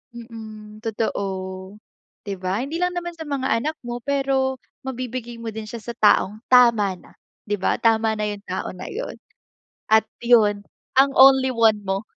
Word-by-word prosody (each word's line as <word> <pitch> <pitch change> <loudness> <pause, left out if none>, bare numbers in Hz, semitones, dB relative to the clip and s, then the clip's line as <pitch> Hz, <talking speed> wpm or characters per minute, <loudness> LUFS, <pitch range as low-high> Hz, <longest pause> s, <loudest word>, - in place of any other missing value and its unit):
Mm, 220 -2 -10
totoo, 190 -3 -4 0.5
'Di 200 -2 -4
ba 190 +5 -1
hindi 315 +5 -4
lang 360 0 0
naman 345 0 -3
sa 320 -2 -8
mga 275 -2 -2
anak 310 +6 -3
mo, 240 0 -5
pero 270 0 0 0.3
mabibigay 250 -2 -5
mo 230 -1 -6
din 215 0 -7
siya 230 0 -8
sa 235 - -5
taong 210 0 +3
tama 235 -6 +5
na - - -19 0.4
'di 205 - 0
ba? - - +1
Tama 225 -1 +2
na 210 - -3
yung 205 -1 -5
tao 185 - -3
na 180 - -9
yun, - - -5 0.7
at 220 0 +5 0.2
yun 220 -4 +4 0.4
ang 270 +1 +6
only 265 0 +7
one 225 -3 +3
mo. 195 +2 -2
225 Hz, 165 wpm, -22 LUFS, 210-265 Hz, 0.7 s, only